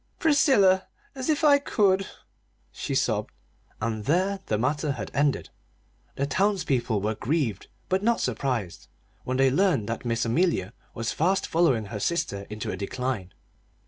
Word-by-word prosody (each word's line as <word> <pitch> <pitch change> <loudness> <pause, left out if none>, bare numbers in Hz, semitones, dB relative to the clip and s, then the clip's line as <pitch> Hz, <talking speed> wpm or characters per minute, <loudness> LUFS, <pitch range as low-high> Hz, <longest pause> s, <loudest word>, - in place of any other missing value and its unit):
"Priscilla 265 - +4 0.3
as 260 +2 -4
if 310 +1 +1
I 285 -2 +6
could!" 195 -7 +2 0.6
she - - -4
sobbed. - - 0 0.5
And 110 -1 -3
there 185 - +1
the 105 - +1
matter 140 +5 0
had - - -6
ended. 145 -1 +1 0.7
The 140 - 0
townspeople 140 - +1
were 105 +2 0
grieved, 115 - -1 0.2
but 185 +1 +1
not 230 +2 +2
surprised, 115 -7 -2 0.4
when 130 0 -1
they 135 0 +4
learned 160 - +2
that 115 - -3
Miss 115 -1 0
Amelia 115 - +1 0.2
was 115 0 -2
fast 185 +5 +1
following 140 -10 +2
her 105 - -3
sister 130 - -2
into 105 0 -4
a - - -4
decline. 105 -1 -3
140 Hz, 145 wpm, -26 LUFS, 115-190 Hz, 0.7 s, I